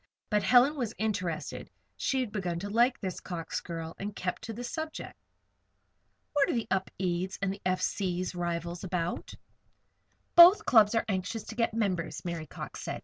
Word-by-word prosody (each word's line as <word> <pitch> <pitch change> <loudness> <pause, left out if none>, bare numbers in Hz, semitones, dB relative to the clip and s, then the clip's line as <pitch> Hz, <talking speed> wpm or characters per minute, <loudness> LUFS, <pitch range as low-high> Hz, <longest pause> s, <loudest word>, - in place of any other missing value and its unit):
But 210 0 +3
Helen 250 +7 +5
was 235 -4 -2
interested; 185 -7 -3 0.3
she 265 - 0
had 240 -5 -3
begun 180 -5 -2
to 200 +1 -5
like 240 +3 +3
this 185 -2 -4
Cox 170 -3 -4
girl, 165 -1 -6
and 205 +1 -5
kept 180 -1 -3
to 225 - -5
the 240 +3 -6
subject. 315 +5 -5 1.2
"What 285 -2 +3
are - - +1
the 230 - 0
Upedes 185 -1 -1
and 195 -1 0
the 200 - -11
F. 185 0 +1
C.'s 185 -2 -1
rivals 170 0 -3
about?" 175 -2 -3 1.0
"Both 345 +4 +9
clubs 220 -2 +6
are 225 - +2
anxious 200 +2 -2
to 220 - -8
get 230 -1 0
members," 180 -8 -1
Mary 170 -3 -4
Cox - - -8
said. - - -4
195 Hz, 170 wpm, -30 LUFS, 175-230 Hz, 1.2 s, Both